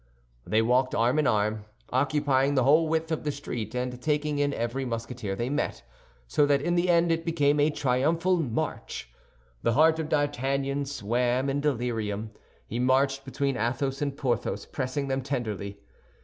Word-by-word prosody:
They 110 +1 +3
walked 125 +2 +2
arm 120 +6 +2
in 150 - +2
arm, 105 -2 +1 0.3
occupying 140 +1 +2
the 130 - +3
whole 155 +5 +5
width 160 +1 -1
of 160 - -1
the 150 - 0
street 120 -6 -5
and 125 0 -3
taking 150 0 0
in 145 0 +2
every 120 +1 -2
Musketeer 115 -4 -4
they 120 +4 -2
met, 145 +3 -2 0.4
so 145 - +3
that 140 -1 +3
in 175 +5 0
the 175 +1 +2
end 170 0 +4
it 165 0 0
became 150 -3 +2
a 145 +1 +4
triumphal 155 +7 +1
march. 115 - -3 0.5
The 115 - +2
heart 160 +4 +4
of 155 -1 -3
D'Artagnan 140 -1 0
swam 125 +1 0
in 145 +1 -1
delirium; 115 -6 -1 0.3
he 115 - -4
marched 135 +2 +2
between 140 -1 -1
Athos 130 +5 -1
and 140 -1 -2
Porthos, 130 -5 -1
pressing 135 +1 -3
them 135 0 -1
tenderly. 110 -7 -3
135 Hz, 165 wpm, -27 LUFS, 120-145 Hz, 0.5 s, whole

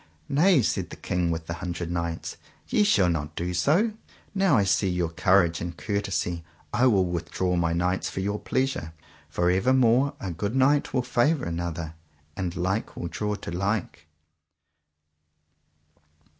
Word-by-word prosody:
Nay, 155 -1 +4
said 95 -4 -1
the - - -8
King 90 -1 -1
with 80 -1 -2
the 85 - -4
Hundred 85 -1 -4
Knights, 85 -1 -3 0.3
ye - - +2
shall 100 - +4
not 80 -2 -2
do 90 +1 -2
so; 170 - +2 0.4
now 195 - +3
I 100 - +4
see 95 0 +2
your 90 -2 0
courage 85 -1 +3
and 85 0 -5
courtesy 95 -5 -2 0.3
I 125 +2 +4
will 100 -6 +4
withdraw 90 +1 -1
my 85 -1 +1
knights 90 +2 0
for 95 - -5
your 100 +2 -1
pleasure, 130 - -1 0.4
for 90 0 +1
evermore 125 +6 +3
a 95 - -4
good 100 +8 -3
knight 140 +2 +3
will 130 -1 0
favour 125 +3 +1
another, 85 -1 -4 0.4
and 90 -2 -3
like 95 +4 -2
will 85 - -4
draw 105 +3 -2
to 90 - -7
like. 95 -4 -2
95 Hz, 155 wpm, -26 LUFS, 85-120 Hz, 0.4 s, Nay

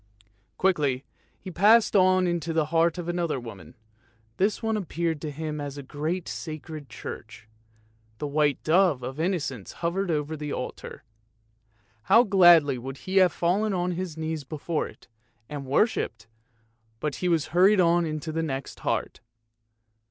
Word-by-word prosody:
Quickly 145 -8 +1 0.3
he 185 - -8
passed 210 +6 +4
on 185 -1 +5
into 170 -2 -1
the 160 -1 +2
heart 165 +1 +3
of 175 -1 -5
another 175 -5 -1
woman; 100 -9 -11 0.6
this 205 +4 0
one 220 0 0
appeared 170 -5 -2
to 155 - -4
him 150 0 -5
as 145 0 -6
a 140 - -7
great 155 +6 -3
sacred 155 -2 -7
church. 110 0 -9 0.7
The 150 - -4
white 145 -1 +1
dove 165 -5 +3
of 130 +4 -6
Innocence 160 - -2
hovered 180 +3 -2
over 155 -1 -1
the 150 -1 -5
altar. 125 - -6 1.0
How 225 +5 +6
gladly 175 - +6
would 135 +2 -7
he 190 +1 -1
have 185 -2 +6
fallen 195 +5 0
on 180 -1 0
his 175 -2 -4
knees 160 -1 -3
before 155 +3 -3
it, - - -16 0.4
and 145 -2 -6
worshipped, 140 - 0 0.7
but 150 +1 -3
he 180 - -1
was 165 -3 +1
hurried 190 +3 +5
on 175 -1 +4
into 155 0 -4
the 165 +1 -1
next 135 -4 -4
heart. - - -2
160 Hz, 150 wpm, -26 LUFS, 145-180 Hz, 1.0 s, How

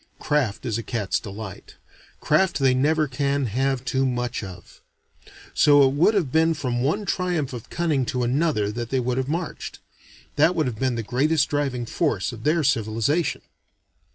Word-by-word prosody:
Craft 135 -8 -1
is 115 -2 -1
a - - -2
cat's 110 -4 -2
delight: 100 -2 -9 0.5
craft 175 +5 +2
they 135 -2 +3
never 150 +4 +2
can 140 +1 -1
have 130 +3 -1
too 130 +1 0
much 125 -3 -2
of. 90 -3 -11 0.7
So 145 -2 +6
it 130 - -1
would 170 +9 +3
have 165 -10 0
been 160 +2 +3
from 125 -4 -2
one 175 +11 0
triumph 175 -7 -1
of 120 -3 -8
cunning 160 -6 0
to 125 -4 -1
another 125 -5 +1
that 120 +1 -5
they 130 - +1
would 125 0 -1
have 130 +1 -2
marched. 165 +2 -4 0.6
That 160 +5 +4
would 155 -3 +1
have 120 -4 -4
been 130 -2 0
the 115 - -3
greatest 140 +6 +1
driving 135 -4 -1
force 115 - -1
of 115 -2 -10
their 155 +2 +2
civilization. 120 +5 0
135 Hz, 175 wpm, -24 LUFS, 120-155 Hz, 0.7 s, So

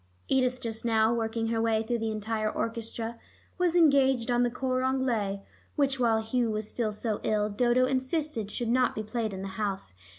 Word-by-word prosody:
Edith 255 -1 +2
just 225 -2 -5
now, 225 -1 +3
working 225 0 -1
her 225 -1 0
way 225 -1 +2
through 235 +1 -1
the 225 0 -1
entire 215 0 -1
orchestra, 230 0 -4 0.4
was 355 -1 +2
engaged 270 -7 +4
on 240 0 +3
the 245 - +3
cor 255 +1 -1
anglais 240 -7 0 0.3
which, 275 -2 +1
while 225 -2 +3
Hugh 235 +1 0
was 215 0 -3
still 220 -1 -2
so 210 0 -2
ill, 210 -1 +1
Dodo 245 +4 +3
insisted 260 -3 -1
should 235 +1 -3
not 255 +1 +2
be 215 - -3
played 220 0 -2
in 190 0 -6
the - - -4
house. 195 - -3
230 Hz, 190 wpm, -28 LUFS, 220-255 Hz, 0.4 s, engaged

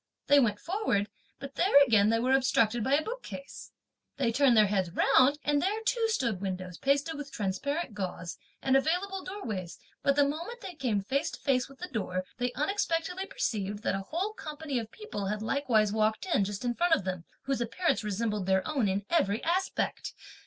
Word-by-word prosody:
They 285 0 +6
went 210 -6 +2
forward, 340 - 0 0.3
but 275 0 -8
there 345 -1 +5
again 215 -4 +4
they 225 - +3
were 255 +3 +2
obstructed 240 -4 +3
by 265 +4 +3
a 310 - +1
bookcase. 450 - -8 0.5
They 255 -4 +1
turned 255 -1 +4
their 215 - +7
heads 190 -3 0
round, 260 +10 +4
and 290 -1 +2
there 400 +6 0
too 455 -1 +1
stood 235 - 0
windows 185 -2 -4
pasted 280 +4 +1
with 280 -1 -7
transparent 235 - -2
gauze 180 -3 -5 0.2
and 265 0 +3
available 360 +7 +1
door 400 +2 -7
ways: 185 -6 -4 0.2
but 280 - +2
the 285 -1 +4
moment 340 +12 -5
they 365 - -7
came 245 - -1
face 270 +9 -1
to - - -9
face 255 -2 +1
with 275 - -15
the 360 - -6
door, 185 - -3
they 245 0 0
unexpectedly 360 +2 -1
perceived 210 - -2
that - - +1
a 195 - -1
whole 345 - -3
company 300 - -4
of 225 -1 -6
people 325 - -6
had 210 +2 -2
likewise 220 -5 +2
walked 215 - +1
in, 200 - +3
just 205 +4 -5
in 240 - +1
front 345 +5 +3
of 280 - -4
them, 185 -2 -3 0.2
whose 270 -2 -1
appearance 240 +4 0
resembled 210 -1 -2
their 190 -1 +2
own 275 -9 +1
in 195 +1 -1
every 225 -11 +2
respect. 370 +3 -1
260 Hz, 195 wpm, -29 LUFS, 210-320 Hz, 0.5 s, their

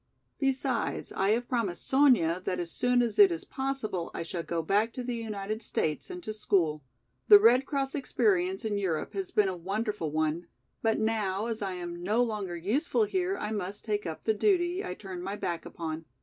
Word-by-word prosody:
Besides, 270 -1 -1
I 195 - 0
have 235 +3 +1
promised 215 -8 -2
Sonya 240 - +4
that 180 - -1
as 170 -1 -3
soon 245 +4 +2
as 220 -3 -2
it 200 -3 +9
is 165 - -3
possible 265 -10 -3
I - - -3
shall 170 +1 -4
go 165 0 -2
back 210 +7 +1
to 250 - -5
the 245 0 -3
United 215 -1 -4
States 155 -7 -2
and 360 -1 -7
to 215 - -4
school. 170 -8 +1 0.5
The 205 - +11
Red 240 +6 +5
Cross 275 -1 -1
experience 365 - +1
in 205 -2 0
Europe 175 -6 -2
has 385 -2 -3
been 210 - +3
a 190 - -2
wonderful 200 0 -2
one, 155 +2 -1 0.3
but 225 -1 +2
now, 215 -2 0
as 230 -2 -3
I 195 -2 -2
am 175 -1 -6
no 215 +7 +2
longer 210 -6 -3
useful 275 - +1
here 385 -1 0
I 210 - -3
must 205 -1 -4
take 210 -3 -1
up 160 - -6
the 220 - +2
duty, 355 - +1
I 180 - -4
turned 185 -3 -7
my 195 +2 -3
back 170 -5 -3
upon. 160 -1 -5
210 Hz, 200 wpm, -29 LUFS, 180-245 Hz, 0.5 s, The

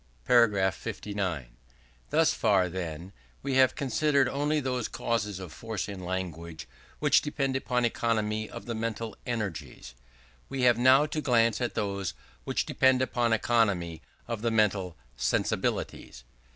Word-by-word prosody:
§ 105 -6 +4
59. 85 -14 -4 0.5
Thus - - +3
far, 95 -4 +2
then, 85 0 -6 0.3
we 140 -1 -1
have 130 -1 +5
considered 140 +1 +2
only 145 +3 0
those 125 -4 -2
causes 105 -4 -2
of 90 -4 -8
force 110 -5 -4
in 100 -2 -7
language 85 -4 -5 0.3
which - - +4
depend 140 -3 -1
upon 125 -2 0
economy 110 -2 0
of - - -9
the 120 - -3
mental 115 0 -3
energies: 85 - -4 0.6
we 135 -2 -2
have 120 -1 +5
now 130 +4 +6
to 155 +1 -3
glance 115 -4 +2
at 120 - -2
those 100 -3 -2 0.3
which - - 0
depend 130 -1 +3
upon 120 -2 0
economy 100 -8 +1 0.3
of 115 -3 -4
the 115 - +1
mental 100 -6 +1 0.2
_sensibilities. - - -1
110 Hz, 140 wpm, -28 LUFS, 95-125 Hz, 0.6 s, now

